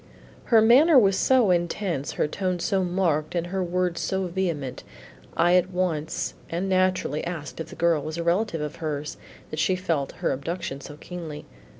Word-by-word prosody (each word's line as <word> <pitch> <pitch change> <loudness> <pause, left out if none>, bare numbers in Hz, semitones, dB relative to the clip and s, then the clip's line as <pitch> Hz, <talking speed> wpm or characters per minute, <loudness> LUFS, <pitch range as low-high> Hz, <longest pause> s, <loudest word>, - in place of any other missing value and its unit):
Her 225 -2 +5
manner 275 +7 +7
was 195 -5 +5
so 245 -2 +4
intense, 175 -4 -1
her - - 0
tone 185 +3 -2
so 190 +2 0
marked 175 -4 0
and 170 -1 0
her 190 +1 -2
words 180 0 -1
so 190 0 -1
vehement, 170 -8 -3 0.5
I 175 +1 +4
at 180 0 +1
once 175 -4 -2 0.2
and 175 +3 -2
naturally 185 -5 +1
asked 165 -4 -6
if 160 - -4
the - - -11
girl 170 -3 +2
was 155 +3 -5
a 170 - -2
relative 170 -1 0
of 150 0 -5
hers 150 -2 -4 0.3
that 155 - -4
she 185 +4 +2
felt 165 -7 -1
her - - -1
abduction 145 0 -4
so 145 +2 -10
keenly. 160 -4 -7
175 Hz, 180 wpm, -25 LUFS, 155-185 Hz, 0.5 s, manner